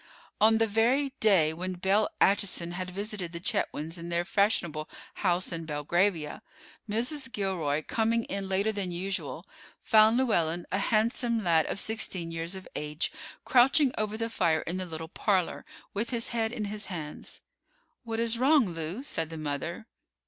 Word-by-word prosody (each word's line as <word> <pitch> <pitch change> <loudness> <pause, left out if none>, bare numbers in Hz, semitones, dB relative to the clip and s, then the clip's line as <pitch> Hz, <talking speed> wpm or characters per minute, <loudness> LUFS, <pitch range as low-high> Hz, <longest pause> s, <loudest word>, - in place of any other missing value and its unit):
On 220 +1 +6
the 225 - +4
very 245 +6 +2
day 180 -8 +4
when 185 +3 -4
Belle 190 +4 +2
Acheson 190 -3 +2
had 180 +1 -4
visited 195 -2 -3
the 170 - -4
Chetwynds 170 -5 -1
in 170 +1 -6
their 170 0 0
fashionable 175 -7 +1 0.3
house 180 -1 +1
in 165 -1 -4
Belgravia, 160 +3 0 0.5
Mrs. 255 +5 -1
Gilroy, 170 -8 -1
coming 230 +4 +1
in 195 -2 -4
later 200 +3 +2
than 200 -4 -3
usual, 185 +3 -3 0.4
found 220 +1 +6
Llewellyn, 175 -9 +1
a 195 - +1
handsome 230 +2 +1
lad 165 -3 +3
of - - -1
sixteen 185 -7 -2
years 165 +3 -3
of 190 - -9
age, 150 +1 -2 0.3
crouching 265 +2 +5
over 215 0 -2
the 230 0 -1
fire 170 -8 +1
in 175 +3 -4
the 185 -1 -4
little 160 -1 -6
parlor, 185 +1 0 0.3
with 210 +4 -1
his 235 -2 -1
head 225 -2 0
in 220 -3 -3
his 210 +1 -4
hands. 160 -6 -6 0.6
"What 225 -1 -3
is 230 0 +1
wrong, 275 0 +5
Lew?" 170 - -4
said 165 - -2
the 165 - -7
mother. 155 +7 -4
195 Hz, 165 wpm, -29 LUFS, 170-225 Hz, 0.6 s, On